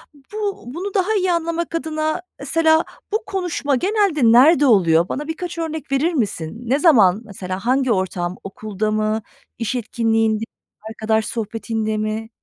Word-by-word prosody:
B 290 +10 -12 0.3
bunu 355 +10 -5
daha 400 +2 +1
iyi 370 -3 +1
anlamak 335 0 -1
adına 310 +1 -2 0.2
mesela 320 +3 +3 0.3
bu 430 +2 0
konuşma 360 -8 -1
genelde 385 - +1
nerede 285 +5 +6
oluyor? 175 -8 +4
Bana 295 +2 -4
birkaç 340 +2 -5
örnek 320 -3 -4
verir 310 +6 +1
misin? 200 - -2
Ne 275 - +3
zaman, 220 - +5
mesela 190 -1 -6
hangi 260 0 +2
ortam? 185 -2 -1
Okulda 215 +1 -3
mı, 215 +1 0 0.4
iş 230 +2 -2
etkinliğinde, 225 -2 0 0.5
arkadaş 220 0 0
sohbetinde 220 0 -3
mi? 215 +1 -3
255 Hz, 140 wpm, -20 LUFS, 215-325 Hz, 0.5 s, nerede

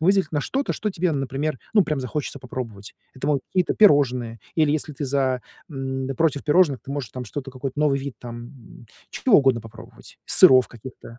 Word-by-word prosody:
выделить 190 0 +2
на 145 - 0
что-то, 275 - -2
что 210 - -3
тебе, 180 -3 -1
например, 135 +1 -2 0.2
ну, 205 -4 +5
прям 150 -3 -2
захочется 140 +3 -4
попробовать. 115 -6 -8 0.2
Это 130 +1 -5
могут 140 -3 +1
какие-то 185 -1 0
пирожные, 125 - +3
или 155 -2 +3
если 155 -1 -2
ты 145 - -4
за 130 -2 0 0.3
м, 135 -2 -4
против 155 -4 +1
пирожных, 150 - +3
ты - - -10
можешь 140 -7 -4
там 125 -1 -6
что-то, 135 +4 -6
какой-то 130 +1 -6
новый 145 -2 +2
вид 140 -2 -6
там 120 0 -11 0.2
чего 245 -6 +3
угодно 135 -4 +3
попробовать, 110 0 -14
сыров 130 -1 +7
каких-то. 120 0 -11
135 Hz, 180 wpm, -23 LUFS, 125-150 Hz, 0.3 s, сыров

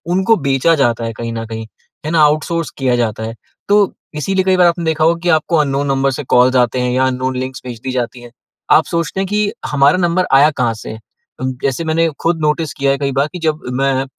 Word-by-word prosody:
उनको 190 +4 +3
बेचा 135 +5 +3
जाता 120 -5 +1
है 115 - -4
कहीं 115 0 -4
न 115 0 -4
कहीं, 110 0 -6 0.4
है 155 - -2
ना, 165 - +3
आउटसोर्स 155 +2 +1
किया 130 -3 +1
जाता 110 -2 -1
है। 115 +1 -5 0.3
तो 205 - +5 0.4
इसीलिए 190 +5 0
कई 190 -1 +3
बार 180 -1 +5
आपने 170 0 0
देखा 160 -1 0
होगा 170 +1 +3
कि 175 +1 -2
आपको 160 +2 -1
अननोन 140 -1 0
नंबर 135 0 +1
से 145 +3 -4
कॉल्स 125 +1 +3
आते 125 0 +2
हैं, 125 0 0
या 130 +1 +2
अननोन 130 0 -2
लिंक 130 +1 -4
भेज 120 -3 -7
दी 130 - -3
जाती 120 -1 -3
हैं। 120 -1 -13 0.4
आप 160 - +5
सोचते 170 +2 -2
हैं 195 - -1
कि 210 +1 0
हमारा 145 +4 +3
नंबर 180 +1 +1
आया 140 +3 +6
कहाँ 120 -3 +1
से? 110 0 -8 0.4
जैसे 130 +3 -2
मैंने 165 +1 +2
खुद 165 0 0
नोटिस 150 0 0
किया 140 -1 0
है 135 - 0
कई 140 -1 -2
बार 140 +2 +1
कि 180 - -6
जब 155 -1 0 0.2
मैं 135 -1 +1
140 Hz, 235 wpm, -16 LUFS, 125-165 Hz, 0.4 s, आया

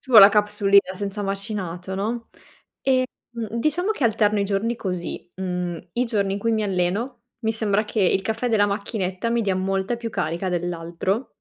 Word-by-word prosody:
Ci 265 - -14
vuole 230 - +10
la 195 - +11
capsulina 205 -2 +3
senza 200 +1 -4
macinato, 195 -2 -3
no, 225 +4 -3 0.5
ehm, 260 -1 +3 0.3
mhmm, 230 0 -4
diciamo 350 - +1
che 360 - -3
alterno 210 -2 +3
i - - +2
giorni 205 +4 0
così: 180 -5 -4
mhmm, 180 -2 -3
i 245 +1 +1
giorni 200 -4 0
in 200 - -3
cui 230 +2 +1
mi 220 -1 +1
alleno, 195 +6 -1 0.2
mi 220 - +2
sembra 215 -1 +1
che 210 +1 -3
il 190 +1 +3
caffè 225 +4 -1
della 205 -2 +4
macchinetta 200 0 -2
mi 235 0 +2
dia 195 -3 +1
molta 195 +4 0
più 235 -1 -5
carica 170 -1 -2
dell'altro. 175 +5 -2
205 Hz, 185 wpm, -23 LUFS, 190-225 Hz, 0.5 s, la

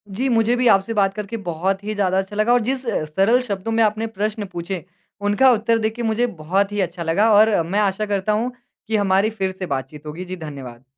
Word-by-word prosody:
जी 255 +6 0
मुझे 230 0 +3
भी 250 0 +2
आपसे 195 +1 +3
बात 195 -2 +2
करके 210 +2 -5
बहुत 190 +4 -1
ही 215 - -3
ज़्यादा 190 -2 +1
अच्छा 195 +2 -2
लगा 215 +3 +3
और 245 - +4
जिस 260 +2 -2
अ, 220 -8 -1
सरल 195 +11 +2
शब्दों 210 -2 -4
में 225 0 +3
आपने 215 +1 0
प्रश्न 210 0 -3
पूछे 175 +1 -4 0.5
उनका 255 +6 +5
उत्तर 230 0 +2
देके 225 +2 -2
मुझे 225 +2 +1
बहुत 195 +6 +1
ही 205 - -3
अच्छा 175 -1 -3
लगा। 170 +7 +2
और 210 -3 +5
मैं 200 +4 0
आशा 205 0 +1
करता 205 0 -1
हूँ 235 +4 -1 0.4
कि 220 - -1
हमारी 200 0 +2
फ़िर 195 -4 -2
से 185 0 -6
बातचीत 150 0 -5
होगी। 160 +5 -6
जी 185 +1 -5
धन्यवाद! 135 -7 -9
205 Hz, 225 wpm, -21 LUFS, 185-225 Hz, 0.5 s, उनका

